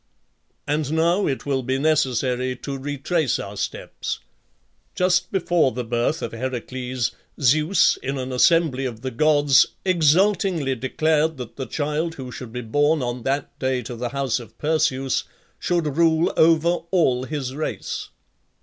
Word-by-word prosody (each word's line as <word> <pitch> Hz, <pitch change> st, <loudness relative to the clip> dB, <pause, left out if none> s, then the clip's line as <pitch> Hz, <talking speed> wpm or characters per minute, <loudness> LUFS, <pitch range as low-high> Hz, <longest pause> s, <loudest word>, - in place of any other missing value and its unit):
And 150 Hz, 0 st, -1 dB
now 170 Hz, +5 st, +2 dB
it 135 Hz, -, -2 dB
will 135 Hz, -2 st, 0 dB
be 130 Hz, +1 st, -1 dB
necessary 130 Hz, -4 st, +1 dB
to 140 Hz, +3 st, -6 dB
retrace 145 Hz, +1 st, -1 dB
our 100 Hz, +1 st, -7 dB
steps. -, -, -4 dB, 0.8 s
Just 180 Hz, -1 st, +2 dB
before 175 Hz, -, +2 dB
the 125 Hz, +2 st, -3 dB
birth 120 Hz, +5 st, -1 dB
of -, -, -3 dB
Heracles, 125 Hz, 0 st, -3 dB, 0.3 s
Zeus, 155 Hz, +7 st, +3 dB
in 135 Hz, +1 st, -3 dB
an 130 Hz, 0 st, -4 dB
assembly 135 Hz, 0 st, +3 dB
of 115 Hz, -3 st, -5 dB
the 130 Hz, 0 st, -4 dB
gods, 145 Hz, +1 st, +4 dB, 0.2 s
exultingly 175 Hz, -3 st, +3 dB
declared 155 Hz, +5 st, 0 dB
that 125 Hz, -3 st, -8 dB
the 130 Hz, -, -5 dB
child 155 Hz, +2 st, -2 dB
who 130 Hz, -2 st, -7 dB
should 125 Hz, -2 st, -8 dB
be 125 Hz, +1 st, -4 dB
born 145 Hz, +5 st, +1 dB
on 120 Hz, 0 st, -3 dB
that 135 Hz, +4 st, -2 dB
day 130 Hz, -1 st, 0 dB
to 120 Hz, +2 st, -6 dB
the 120 Hz, +1 st, -3 dB
house 135 Hz, -1 st, -1 dB
of 120 Hz, -, -13 dB
Perseus 150 Hz, -4 st, 0 dB, 0.3 s
should 165 Hz, -5 st, 0 dB
rule 165 Hz, 0 st, +3 dB
over 165 Hz, +1 st, +4 dB, 0.2 s
all 130 Hz, -9 st, +2 dB
his 135 Hz, -3 st, -4 dB
race. 155 Hz, -, -4 dB
140 Hz, 150 wpm, -23 LUFS, 125-160 Hz, 0.8 s, gods